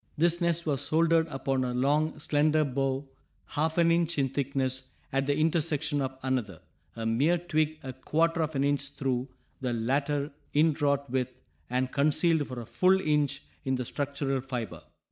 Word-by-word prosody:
This 170 +2 +2
nest 170 -1 +1
was 145 -5 0
soldered 165 0 +3
upon 135 -2 -1
a 125 -1 -2
long 150 +5 +1
slender 150 +1 +2
bough 135 0 -1 0.4
half 160 +2 -1
an 170 -1 +5
inch 170 -1 +1
in 135 -2 +2
thickness 130 -1 -2 0.2
at 135 0 +1
the 145 0 +1
intersection 155 -2 +1
of 130 0 -3
another, 120 -10 -1 0.4
a 115 -1 -4
mere 140 +10 +3
twig 155 -2 0
a 130 -1 -5
quarter 165 +5 +1
of 155 -1 -2
an 135 - +2
inch 140 -1 0
through, 130 -2 -1 0.3
the 125 -2 -1
latter 140 +5 0 0.2
inwrought 145 -2 +2
with, 130 0 -1 0.4
and 130 +1 0
concealed 155 +1 +2
for 125 -1 -6
a - - -8
full 185 - +3
inch 150 -5 +1 0.2
in 130 0 0
the 125 -1 -3
structural 140 0 -2
fiber. 125 -5 -5
140 Hz, 165 wpm, -29 LUFS, 130-155 Hz, 0.4 s, an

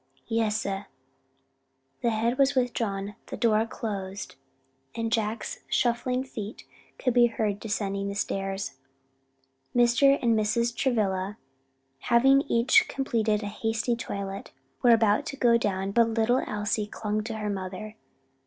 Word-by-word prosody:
"Yes, 225 -1 0
sah." 195 -1 -3 1.2
The 235 - +2
head 230 +3 0
was 275 0 +4
withdrawn, 210 -5 -1
the - - -6
door 225 -1 +2
closed, 200 -3 -5 0.6
and 230 -1 -2
Jack's 225 - -1
shuffling 250 +1 +1
feet 220 -5 -7 0.3
could 250 - 0
be 240 0 +6
heard 215 -3 -2
descending 200 -2 -2
the 200 - -5
stairs. 195 -6 -3 1.0
Mr. 245 +3 +5
and 235 -2 +2
Mrs. 230 +2 +1
Travilla, 205 -6 0 0.6
having 265 - +4
each 235 +2 +4
completed 225 -5 0
a - - -3
hasty 225 +3 -1
toilet, 200 -3 -5 0.3
were 245 - +4
about 225 +4 +4
to 280 - -5
go 235 -2 +4
down; 195 -4 0
but 230 +2 +4
little 225 +3 +2
Elsie 210 0 -1
clung 215 0 -3
to 225 -1 -4
her 210 -1 -2
mother. 195 +2 -6
220 Hz, 135 wpm, -27 LUFS, 205-235 Hz, 1.2 s, be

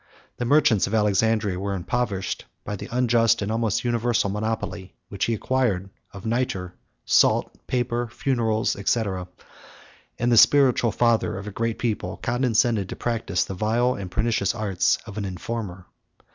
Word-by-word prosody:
The 120 - -2
merchants 140 -6 +4
of 105 - -1
Alexandria 105 -2 +1
were 100 0 -2
impoverished 100 0 -2 0.2
by 105 - -4
the - - -8
unjust, 120 -3 +3
and 100 - -2
almost 115 -2 0
universal, 120 -4 +1
monopoly, 105 -3 -4
which 100 -1 -1
he 115 - 0
acquired, 105 -6 0 0.2
of 100 +1 -10
nitre, 115 -6 -1 0.3
salt, - - +3
paper, 120 -1 -1
funerals, 115 -2 0
&c.: 115 +3 +2 1.1
and 120 +1 +1
the 120 - +4
spiritual 130 -2 +5
father 115 -4 +1
of 100 - -7
a 105 - -6
great 115 +2 -2
people 105 -5 -2
condescended 120 -4 +1
to - - -5
practise 115 -6 -1
the - - -6
vile 115 +6 +1
and 100 -5 -6
pernicious 110 +1 0
arts 100 -5 +1
of 110 -1 -7
an - - -3
informer. 95 -1 -5
110 Hz, 150 wpm, -24 LUFS, 100-120 Hz, 1.1 s, spiritual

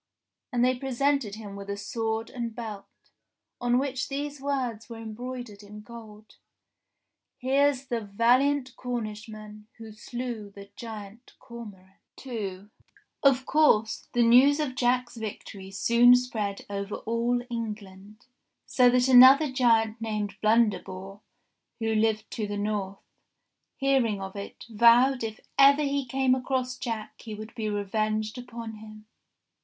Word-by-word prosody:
And 245 -1 +2
they 255 0 +1
presented 270 -4 0
him 210 -2 -9
with 200 0 -9
a 200 - -3
sword 225 +2 -3
and 235 -3 -5
belt, 220 -4 -7 0.7
on 245 0 +2
which 260 -1 -2
these 285 0 -4
words 250 -6 -3
were 230 - -8
embroidered 225 -1 -7
in 210 +1 -11
gold: 215 -1 -13 1.0
Here's 275 +1 +1
the 240 -3 -2
valiant 250 +6 +2
Cornishman, 215 -3 -6
Who 225 -1 -10
slew 235 -1 -6
the 200 0 -13
giant 220 0 -9
Cormoran. 205 -6 -12 0.3
II 205 -5 -5 0.5
Of 265 -2 +3
course 225 -8 +2
the 240 - +3
news 260 +6 +6
of 295 -4 -1
Jack's 250 -1 0
victory 200 -3 -7
soon 235 +5 +5
spread 220 -5 -2
over 200 0 -4
all 235 +2 -1
England, 210 -1 -7 0.4
so 250 -1 +4
that 250 +1 +3
another 265 +3 +8
giant 230 -3 +2
named 210 -2 -3
Blunderbore, 205 -3 0 0.6
who 225 -1 -1
lived 220 0 0
to 215 -2 -3
the 205 0 -4
north, 205 -2 -3 0.7
hearing 265 -7 +1
of 190 0 -7
it, 200 0 -8
vowed 235 +3 +5
if 220 -1 -5 0.2
ever 280 +2 +7
he 280 -2 -1
came 265 +1 +2
across 255 -1 -1
Jack 230 -4 -6
he 220 -2 -7
would 215 +2 -9
be 220 -3 -3
revenged 215 +2 -2
upon 230 -3 -8
him. 215 0 -12
230 Hz, 135 wpm, -27 LUFS, 210-250 Hz, 1.0 s, another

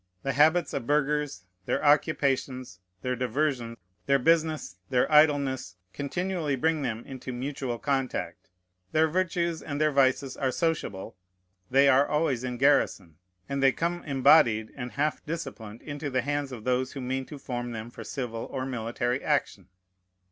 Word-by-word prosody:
The 135 - -1
habits 155 +4 +3
of 120 - -3
burghers, 150 -7 0 0.2
their - - 0
occupations, 135 - +1 0.2
their 125 0 0
diversion, 125 -1 -1 0.3
their 140 0 +5
business, 155 - +1
their 125 -1 +3
idleness, 140 -9 +3 0.2
continually 165 +1 -2
bring 160 +4 +1
them 120 -4 -3
into 130 -1 -7
mutual 130 -1 -3
contact. 135 0 -2 0.4
Their 160 +1 +4
virtues 170 -1 -1
and 145 -1 -4
their 155 0 +3
vices 135 -1 +2
are 135 - 0
sociable; 155 - -2 0.5
they 135 +2 +5
are 140 +1 +5
always 150 -5 0
in 125 -1 -3
garrison; 100 - +2 0.3
and 140 0 -2
they 135 -1 +6
come 175 +1 -2
embodied 130 -6 +4
and 125 -3 -6
half 150 +2 -1
disciplined 135 -9 -6
into 145 -1 -5
the 130 -2 0
hands 145 0 -2
of 120 -4 -8
those 130 +1 0
who 140 - -6
mean 130 +1 -3
to 150 - -8
form 120 -2 -4
them 115 +1 -6
for - - -9
civil 120 -4 -4
or 130 -1 -3
military 120 0 -2
action. 135 - -1
135 Hz, 155 wpm, -27 LUFS, 125-150 Hz, 0.5 s, they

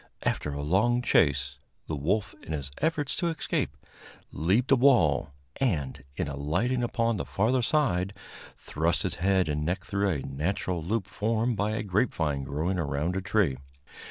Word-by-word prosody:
After 75 - -1
a 70 0 -4
long 110 +10 +2
chase, 70 - +2 0.3
the 80 - -3
wolf, 95 +9 0
in 80 - -6
his 70 -2 -4
efforts 150 -3 0
to 175 - 0
escape, 165 -1 -2 0.5
leaped 100 - +1
a - - +8
wall, 120 - +4 0.3
and, 75 - -1
in - - -1
alighting 85 - 0
upon 115 -1 0
the - - -2
farther 120 +6 +1
side, 100 - +1 0.4
thrust 80 +3 0
his - - -2
head 95 0 +2
and 75 0 -1
neck 90 +5 -1
through 100 0 0
a 75 -7 -1
natural 85 +4 -2
loop 105 +3 -1
formed 115 +4 0
by 105 +1 0
a - - -2
grapevine 90 - 0
growing 80 +7 -1
around 75 +3 -1
a 95 - -1
tree. 95 -8 +1
95 Hz, 160 wpm, -28 LUFS, 75-115 Hz, 0.5 s, a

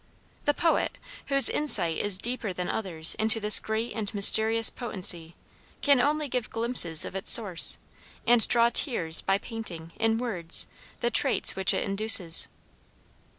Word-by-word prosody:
The 290 - -1
poet, 330 -1 -2 0.3
whose 275 -3 +4
insight 185 - 0
is 205 -2 +2
deeper 235 -1 -5
than 180 0 -7
others' 170 -6 +4
into 220 +1 +1
this 210 -1 +2
great 220 +2 -6
and 215 -3 -6
mysterious 220 +3 +1
potency, 175 -8 -4 0.5
can 280 -3 +1
only 300 +2 -2
give 250 -4 -6
glimpses 225 -9 +1
of - - -10
its 195 - -5
source, 195 -7 +2 0.5
and 240 -2 +1
draw 235 0 +1
tears 165 - +6
by 195 0 -2
painting, 195 -7 -6
in 225 0 -1
words, 185 -9 -3 0.4
the 240 0 -3
traits - - 0
which 190 0 +1
it - - -3
induces. 195 -4 +2
220 Hz, 150 wpm, -24 LUFS, 185-240 Hz, 0.5 s, tears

